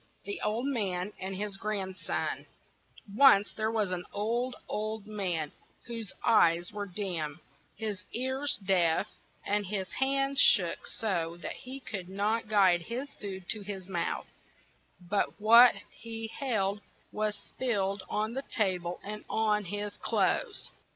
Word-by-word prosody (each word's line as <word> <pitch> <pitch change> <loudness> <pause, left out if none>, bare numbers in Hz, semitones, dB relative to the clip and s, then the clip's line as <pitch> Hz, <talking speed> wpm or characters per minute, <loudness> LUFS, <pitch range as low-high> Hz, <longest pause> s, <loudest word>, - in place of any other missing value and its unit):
THE 405 - -4
OLD 220 +4 0
MAN 205 -7 -1
AND 190 +1 -4
HIS 200 0 -3
GRANDSON 195 -2 -3 0.7
ONCE 230 -6 +7
there 220 0 0
was 215 -4 0
an 180 -1 -2
old, 235 +5 -1
old 215 0 -2
man, 180 -8 -2 0.3
whose 230 -4 -5
eyes 170 -5 +4
were 205 -1 -3
dim, 175 -6 -3 0.4
his 210 -3 -4
ears 260 +4 -1
deaf, 175 -4 +3 0.4
and 205 -1 0
his 190 -1 -3
hands 275 +1 +2
shook 175 -11 +5
so 170 -6 -2
that - - -3
he 260 +2 -8
could 190 -8 -6
not 210 +4 0
guide 190 -5 +5
his 250 +9 -5
food 190 -3 -7
to 215 - 0
his 195 -2 -6
mouth, 175 -3 -2 0.7
but 190 +3 -1
what 230 +3 +8 0.2
he 225 0 -7
held 210 -6 -1 0.3
was 215 0 -1
spilled 200 -4 -2
on 215 +2 -1
the 270 - -2
ta 195 -9 0
ble 175 +1 -5
and 210 +1 -6
on 210 -2 +2
his 205 +3 -3
clothes. 480 -4 0
210 Hz, 140 wpm, -30 LUFS, 190-225 Hz, 0.7 s, what